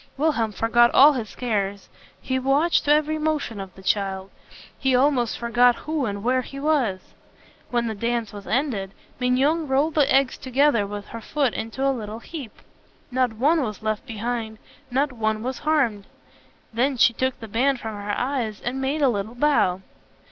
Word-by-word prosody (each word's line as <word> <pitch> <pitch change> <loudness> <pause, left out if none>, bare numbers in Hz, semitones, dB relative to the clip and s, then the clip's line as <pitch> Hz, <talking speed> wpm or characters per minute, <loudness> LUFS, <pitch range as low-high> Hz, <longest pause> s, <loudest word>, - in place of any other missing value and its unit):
Wilhelm 270 -7 +1
forgot 230 +4 +3
all 290 +3 +8
his 230 -6 -5
cares. 205 -5 -2 0.3
He 260 0 -2
watched 285 +6 +2
every 305 +1 +3
motion 305 -8 -2
of 190 -2 -8
the 190 - -14
child. 195 -1 -1 0.5
He 265 -2 +2
almost 255 -3 +2
forgot 240 +1 +3
who 305 -3 -2
and 200 0 -4
where 255 +2 +2
he 275 +2 -9
was. 270 -11 0 0.6
When 240 -1 0
the 225 - -2
dance 230 +1 -2
was 200 -1 -9
ended, 220 -7 -1 0.2
Mignon 275 +6 +1
rolled 280 +4 +1
the 295 -2 +3
eggs 270 -1 +2
together 260 -5 +2
with 205 0 -7
her 230 - -7
foot 275 +1 0
into 245 +5 -2
a 275 - +2
little 215 -3 -6
heap. 260 -1 -9 0.5
Not 250 -2 +1
one 295 +9 +2
was 215 -4 -4
left 215 +4 -2
behind, 225 0 -4 0.3
not 270 +2 0
one 220 -2 -1
was 255 0 -3
harmed. 270 -10 0 0.7
Then 260 +4 +1
she 235 - +5
took 260 +2 -1
the 225 - -8
band 255 +5 +1
from 220 -2 -5
her 205 0 -4
eyes, 245 -5 -2
and 260 +2 -3
made 285 +3 0
a - - +6
little 220 -1 -2
bow. 240 -10 +2
245 Hz, 175 wpm, -23 LUFS, 220-275 Hz, 0.7 s, all